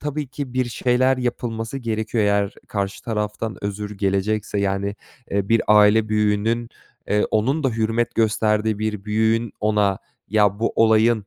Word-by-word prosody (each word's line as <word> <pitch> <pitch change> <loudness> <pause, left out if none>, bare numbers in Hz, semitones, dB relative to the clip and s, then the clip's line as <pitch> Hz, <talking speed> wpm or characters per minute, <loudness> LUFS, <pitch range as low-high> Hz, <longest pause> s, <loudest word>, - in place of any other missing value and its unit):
tabii 150 0 -3
ki 140 -2 -6
bir 130 0 +2
şeyler 130 +2 +2
yapılması 120 -1 -3
gerekiyor. 110 -2 -1
Eğer 100 0 +1
karşı 100 -1 -3
taraftan 105 -1 -4
özür 105 +1 -4
gelecekse, 100 +1 0
yani, 100 +1 -1 0.3
eee, 100 -1 -1
bir 115 0 +3
aile 105 +1 +5
büyüğünün, 110 +2 +1 0.4
eee, 105 0 +2
onun 130 +9 +1
da 135 - +4
hürmet 115 +1 -1
gösterdiği 110 -1 +1
bir 105 -2 -3
büyüğün 110 +1 +1
ona, 105 -2 +1 0.3
"Ya, 105 -1 +2
bu 115 - 0
olayın, 110 -1 +3
110 Hz, 145 wpm, -22 LUFS, 105-115 Hz, 0.4 s, aile